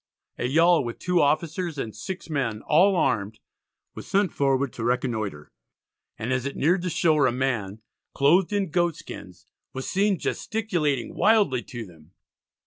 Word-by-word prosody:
A 120 - 0
yawl, 165 +3 +4
with 120 -1 -5
two 180 -1 +1
officers 160 +2 0
and 110 -6 -5
six 180 - -6
men 130 -9 -2
all 185 +6 +4
armed, 110 - 0 0.5
was - - -9
sent 200 -1 +1
forward 135 -1 +1
to 115 - -6
reconnoitre, 115 - -2 0.7
and 120 +4 -2
as 130 -2 -1
it 140 - -6
neared 175 +6 +2
the 180 - -2
shore 155 -5 +3
a - - +1
man 115 -5 -2 0.3
"clothed 170 +8 +3
in 200 -5 -1
goat 175 -2 +1
skins" - - -11 0.3
was 130 0 -5
seen 200 0 +1
gesticulating 170 - -2
wildly 205 - +3
to 120 -2 -8
them. 85 -2 -18
140 Hz, 155 wpm, -25 LUFS, 120-175 Hz, 0.7 s, yawl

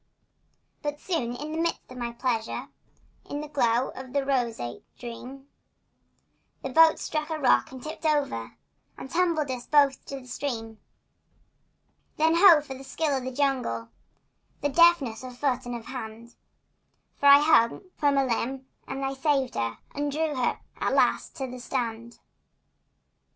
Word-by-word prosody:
But 295 0 -3
soon, 255 -11 -2
in 300 +4 -6
the 320 - -3
midst 335 -5 -2
of - - -9
my 240 -1 -3
pleasure, 235 -2 -2 0.6
In 285 - -3
the 300 - -6
glow 250 -4 +1
of 260 0 -10
a 280 -1 +1
roseate 235 - -2
dream, 255 +3 -9 1.2
The 270 - -3
boat 325 +3 +6
struck 305 0 -3
a 320 - -2
rock 265 -4 +3
and 260 -1 -10
tipped 310 +1 -7
over 280 - -1 0.4
And 265 - -9
tumbled 330 -5 +1
us 250 -1 -5
both 280 -3 +3
in 275 -1 -6
the - - -16
stream. 225 -4 -4 1.4
Then, 320 +1 +4
ho, 335 -2 +8
for 275 -2 -8
the 265 +1 -10
skill 290 +2 -1
of 260 -1 -3
the 260 - -3
jungle! 250 - -1 0.7
The 290 - +1
deftness 285 -7 +4
of 250 -1 -9
foot 255 -2 -1
and 245 - -3
of 230 -1 -7
hand! 235 -2 -8 0.8
For 285 - +2
I 280 0 +10
hung 295 -5 +4
from 285 -2 +2
a 275 - +3
limb 260 +2 -2 0.2
and 270 0 -3
I 270 - -1
saved 270 -1 +1
her 115 -1 -2 0.2
And 290 0 -2
drew 310 +1 0
her 255 -3 -1 0.2
at - - 0
last - - +2
to 270 - -3
the 250 -1 -8
strand. 235 -2 -4
265 Hz, 160 wpm, -27 LUFS, 240-290 Hz, 1.4 s, I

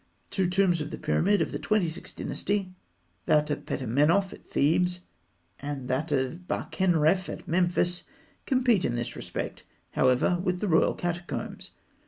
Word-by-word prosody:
Two 190 -2 +1
tombs 180 -2 +2
of 150 - -4
the - - -6
period 195 +6 +2
of - - -5
the - - -3
Twenty 215 -4 +1
sixth 160 - -6
Dynasty 195 -2 -2 0.5
that 150 0 +3
of - - -4
Petamenoph 150 - +2
at - - -15
Thebes 180 +5 +2 0.6
and 140 -2 -5
that 145 +5 -1
of 140 +6 -1
Bakenrenf 180 0 +1
at - - -7
Memphis 175 0 +1 0.5
compete 250 -8 +3
in 120 - 0
this 120 0 -3
respect, - - -5 0.3
however, 130 +8 +3
with 180 -2 0
the 210 - -1
royal 160 -3 +3
catacombs. 175 0 -4
175 Hz, 150 wpm, -28 LUFS, 150-185 Hz, 0.6 s, that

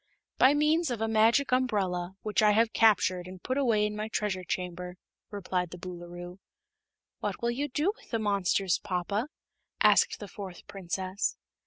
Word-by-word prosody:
"By 265 +3 +6
means 305 +2 +2
of 240 -3 -2
a 225 - 0
Magic 225 +5 +3
Umbrella, 190 -8 0
which 215 0 +1
I 210 -1 +5
have 225 +1 +3
captured 185 -5 +3
and 185 0 -9
put 255 - -1
away 230 -7 +2
in 210 0 -3
my 215 +1 -3
Treasure 210 -4 -2
Chamber," 180 0 -4 0.3
replied 180 -3 -2
the 180 - -9
Boolooroo. 175 0 -8 0.8
"What - - -3
will 235 - +2
you 280 +5 -2
do 310 +10 0
with - - -20
the 230 - 0
monsters, 195 -3 +1
papa?" 200 +6 -2 0.5
asked - - +4
the 205 - -7
fourth 190 -2 -9
Princess. 190 +1 -3
205 Hz, 165 wpm, -29 LUFS, 180-230 Hz, 0.8 s, By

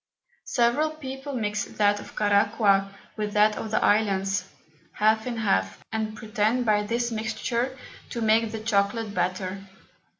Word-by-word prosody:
Several 245 +5 +2
People 270 -1 -7
mix 210 -4 -1
that 205 -1 +1
of - - -11
Caraqua 200 -1 +3 0.2
with 210 -1 -3
that 210 0 +4
of 220 - -5
the 215 - +1
Islands, 195 -3 +1 0.4
half 220 +2 +2
in 240 -2 -3
half, 95 - 0
and 220 -1 -3
pretend 220 +3 0
by 210 -2 +3
this 235 +3 -1
Mixture 235 +3 -2 0.3
to 235 - -4
make 220 0 +3
the 225 - -4
Chocolate 210 0 0
better. 185 +1 -2
215 Hz, 140 wpm, -26 LUFS, 205-230 Hz, 0.4 s, that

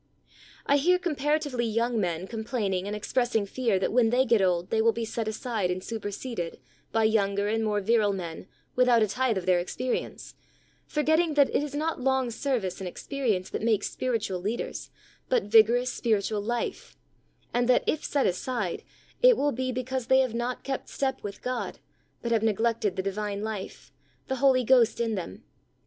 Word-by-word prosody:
I 285 - +4
hear 355 +6 +4
comparatively 295 -6 -1
young 230 +1 0
men 175 -2 -1
com 225 0 -5
plaining 200 -6 -1
and 210 - -3
expressing 225 0 0
fear 225 -1 0
that 190 - -1
when 240 -2 +4
they 250 +3 +3
get 230 -4 +3
old 180 -2 +1
they 220 - +2
will 230 +1 +4
be 230 0 -3
set 225 0 -3
aside 220 -3 -2
and 180 +1 -2
su 225 -1 -4
perseded 205 -3 -5 0.4
by 225 0 +2
younger 200 -2 +2
and 225 +1 0
more 210 -1 0
virile 215 0 +3
men 175 -2 -6 0.3
without 245 -3 +5
a - - +2
tithe 250 +1 0
of 185 - -3
their 180 -1 +4
experience, 250 +8 -4 0.5
for 300 - -1
getting 315 0 +2
that 285 -2 +4
it - - +3
is 290 -1 -5
not 310 -1 -2
long 265 -1 +1
service 225 -8 -2
and 190 - -4
ex 175 - -9
perience 230 -10 -1
that - - -3
makes 220 -2 +1
spiritual 220 -7 -2
leaders, 215 +6 -4 0.4
but - - +2
vigorous 235 +3 +4
spiritual 215 -2 0
life, 235 +3 -4 0.6
and 245 0 +1
that 250 - +4
if 310 - 0
set 285 -2 +1
aside, 205 0 -2 0.4
it - - +7
will 290 +1 +2
be 255 +1 -2
because 255 0 -3
they 265 0 +5
have 255 -4 -1
not 240 +2 -3
kept 270 -1 -4
step 265 -1 -2
with 200 -1 -7
God;, 250 -1 -3 0.5
but 235 - -2
have 225 -2 +3
neglected 220 -2 +1
the 190 - -2
divine 200 +1 -3
life, 215 -3 -6 0.4
the 265 - -1
Holy 260 -1 +4
Ghost 240 -2 +4
in 230 -1 0
them. 175 - -6
230 Hz, 190 wpm, -27 LUFS, 205-255 Hz, 0.6 s, it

